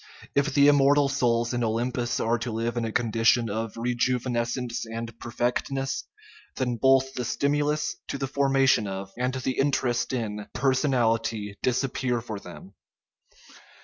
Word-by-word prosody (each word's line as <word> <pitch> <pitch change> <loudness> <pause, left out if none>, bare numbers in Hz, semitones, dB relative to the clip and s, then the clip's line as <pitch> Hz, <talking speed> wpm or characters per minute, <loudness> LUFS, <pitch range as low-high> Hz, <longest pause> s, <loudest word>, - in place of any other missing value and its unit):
If 140 +1 +2
the 140 0 +6
immortal 145 0 +5
souls 120 -3 +1
in 120 0 0
Olympus 120 +2 -1
are 115 +1 +1
to 115 - -3
live 115 +2 -2
in 120 -1 -1
a 110 - -3
condition 115 0 +2
of 110 +1 -3
rejuvenescence 120 0 -1
and 115 0 -6
perfectness, 125 +3 -2 0.5
then 125 -2 -1
both 135 +2 +3
the 125 - -3
stimulus 145 +4 0
to - - -3
the 135 - -2
formation 135 -4 +2
of, 95 0 -5
and 125 +2 -1
the 130 0 -2
interest 130 -3 +1
in, 105 -5 -3
personality 115 -6 +1
disappear 125 -1 0
for 110 -3 -6
them. 95 +1 -12
120 Hz, 140 wpm, -26 LUFS, 115-135 Hz, 0.5 s, the